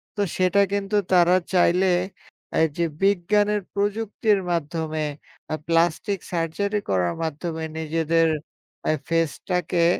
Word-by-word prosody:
তো 205 - -1 0.2
সেটা 185 +2 +3
কিন্তু 200 +1 -1 0.2
তারা 180 0 +6 0.2
চাইলে 180 +1 +4 0.7
এই 160 - +5
যে 170 - +2 0.2
বিজ্ঞানের 205 +2 +2
প্রযুক্তির 205 +1 +1
মাধ্যমে 160 -1 -2 0.5
আ - - +2
প্লাস্টিক 170 +4 +1
সার্জারি 190 +5 -1
করার 90 -2 +1
মাধ্যমে 160 +1 -4 0.2
নিজেদের 165 +1 +1 0.6
আ - - +5 0.2
ফেসটাকে 170 +1 0
175 Hz, 110 wpm, -24 LUFS, 165-200 Hz, 0.7 s, তারা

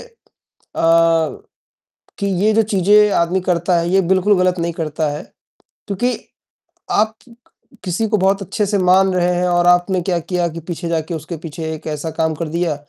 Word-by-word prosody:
अ, - - -12 2.1
कि 200 - -2 0.2
ये 215 +1 +4
जो 225 - +4
चीज़ें 210 0 +3
आदमी 175 +2 +1
करता 175 0 +1
है 170 - -1
ये 190 +1 +4
बिल्कुल 195 +2 +3
ग़लत 180 0 +1
नहीं 170 0 -1
करता 155 -1 -2
है, 150 +3 -5 0.6
क्योंकि 245 +5 -1 0.7
आप 220 +1 +2 0.2
क 235 - -16 0.5
किसी 190 +4 -1
को 215 - +2
बहुत 195 +1 +1
अच्छे 200 +2 -2
से 205 +1 0
मान 185 +1 +4
रहे 180 0 +1
हैं 180 +1 0
और 175 0 +2
आपने 180 +1 +3
क्या 175 0 -1
किया 175 +1 -1
कि 165 - -7
पीछे 170 0 -4
जाकर 165 0 -2
उसके 160 +2 -6
पीछे 165 +1 -8
एक 155 - -9
ऐसा 155 +1 -4
काम 160 0 -1
कर 165 - -4
दिया, 170 -1 -1
180 Hz, 180 wpm, -18 LUFS, 165-195 Hz, 2.1 s, ये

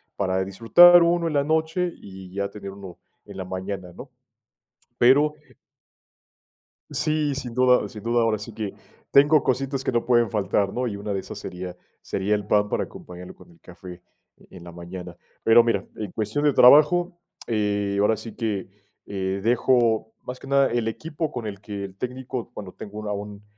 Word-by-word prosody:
para 95 -1 -1
disfrutar 175 - +7
1 170 0 +2
en 155 - -2
la 140 -1 +2
noche 160 +3 0
y 95 -1 -12
ya 100 0 -2
tener 100 -1 -8
1 95 -3 -11 0.3
en - - -12
la 95 - -4
mañana, 95 -1 -5
¿no? - - -11 0.9
Pero 145 +5 +5 1.6
Sí, 155 -2 0
sin 125 -4 -6
duda. 125 0 +3
Sin 110 -3 -11
duda, 120 0 +1
ahora 110 -2 +1
sí 110 +2 -9
que, 105 -3 -5 0.4
tengo 145 +2 +6
cositas 135 +1 -1
que - - -1
no 120 -1 0
pueden 120 -3 +3
faltar, 100 -1 0
¿no?, 125 0 -1
y 100 - -4
una 100 0 -4
de 95 - -1
esas - - -9
sería 90 0 -7 0.3
sería 100 +2 -1
el 105 -1 -4
pan, 105 -1 +2
para - - 0
acompañarlo 90 0 -11
con 90 - -18
el 85 - -22
café 90 0 -12 0.5
en 90 -2 -13
la 85 - -10
mañana. 85 +1 -9 0.3
Pero 115 +1 +6
mira, 115 - 0
en 105 -4 -6
cuestión 110 +9 -2
de 145 - +4
trabajo, 155 +8 +6 0.3
eh, 105 -3 -1
ahora 105 +2 +3
sí 110 0 -9
que, 105 -5 -3 0.4
eh, 95 -1 -3
dejo 115 -2 +2
más 125 0 -7
que - - -12
nada 140 0 +4
el 120 -2 -1
equipo 155 +6 -4
con 120 -3 -5
el 100 -2 -6
que 100 -1 -6
el 95 -1 -11
técnico, 125 0 -5
bueno, 100 -5 -8
tengo 105 0 -9
un 105 - -6
a - - -2
un 100 0 -7
110 Hz, 185 wpm, -24 LUFS, 100-130 Hz, 1.6 s, disfrutar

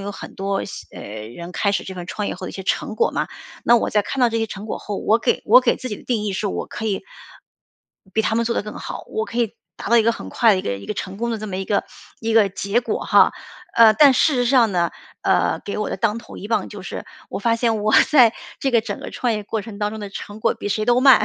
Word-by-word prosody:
有 200 +1 -5
很 - - -9
多 195 0 -2
新 - - -9
呃， - - -7 0.3
人 170 +9 -9
开 200 +2 +1
始 - - -1
这 190 - -7
份 180 -1 -7
创 205 +2 -3
业 - - -3
后 185 - -7
的 - - -5
一 - - -12
些 190 - -6
成 - - -1
果 465 - +2
嘛。 - - -1 0.4
那 240 - +6
我 - - 0
在 210 - +2
看 265 +6 -4
到 245 - +5
这 230 0 -1
些 225 - 0
成 205 0 -8
果 - - -4
后， 205 -1 -5
我 220 - +3
给 225 - 0
我 245 +4 +8
给 - - +2
自 255 - -6
己 210 - -4
的 - - -14
定 230 -4 0
义 205 - -1
是， 205 +2 -2
我 - - -3
可 215 - -7
以， 200 -2 -1 1.1
比 220 - +2
他 220 - 0
们 235 - +2
做 235 - 0
得 - - 0
更 210 0 -8
好， - - -7
我 440 0 -2
可 240 - -6
以 230 -3 0 0.2
达 - - -6
到 235 - +5
一 - - +5
个 230 +1 +3
很 - - -8
快 230 -2 +4
的 190 - +1
一 - - -3
个 100 - -2
一 100 - -11
个 - - -3
成 190 0 -5
功 235 +3 -2
的 225 - -2
这 215 - -6
么 185 - -4
一 190 - -3
个 205 - 0 0.4
一 225 0 -1
个 220 -3 +5
结 200 +4 0
果 240 - -2
哈。 - - +5 0.4
呃， 230 -1 +8
但 285 +1 +7
事 300 +3 +3
实 245 -1 +1
上 235 -5 +4
呢， 175 -1 +1 0.3
呃， - - +2
给 200 - -4
我 210 - -2
的 - - -2
当 225 -2 +1
头 - - -11
一 205 - -8
棒 220 -4 0
就 205 -3 -9
是， 185 - -6 0.2
我 - - -4
发 230 +3 +1
现 225 -3 0
我 215 - +1 0.2
在 250 -7 +7 0.3
这 270 - +1
个 235 -2 +4
整 220 - -5
个 - - -7
创 245 -2 -1
业 210 -1 -4
过 220 +2 -2
程 210 -1 -9
当 210 0 0
中 220 0 -7
的 205 - -5
成 205 +2 -8
果 - - +2
比 205 - -5
谁 215 +2 0
都 245 +1 +4
慢。 260 -5 +7
215 Hz, 320 characters per minute, -21 LUFS, 200-235 Hz, 1.1 s, 我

